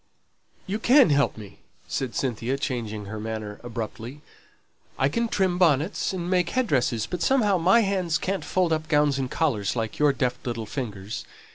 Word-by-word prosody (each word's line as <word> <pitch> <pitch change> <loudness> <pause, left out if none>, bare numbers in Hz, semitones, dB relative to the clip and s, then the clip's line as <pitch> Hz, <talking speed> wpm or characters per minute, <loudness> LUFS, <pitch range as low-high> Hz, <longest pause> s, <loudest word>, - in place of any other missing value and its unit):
"You 205 +3 -3
can 255 - +6
help 140 -3 +2
me," 105 -3 -11 0.3
said 130 -3 -3
Cynthia, 125 0 -1
changing 115 -7 -3
her 110 +2 -6
manner 110 -1 -5
abruptly. 115 +3 -6 0.8
"I 135 - +2
can 235 +10 0
trim 185 -4 0
bonnets, 165 +1 +2
and 180 -2 -4
make 180 -2 +2
head 255 +5 +1
dresses; 120 - +1
but 175 +9 -5
somehow 210 -3 +3
my 190 +8 +5
hands 185 -5 0
can't 195 +1 -2
fold 180 -3 +1
up 155 0 -2
gowns 150 -2 +2
and 130 -1 -2
collars, 120 -12 0
like 110 -2 -3
your 150 -1 +5
deft 125 -2 -2
little 115 -2 -3
fingers. 105 -3 -5
140 Hz, 170 wpm, -25 LUFS, 115-180 Hz, 0.8 s, can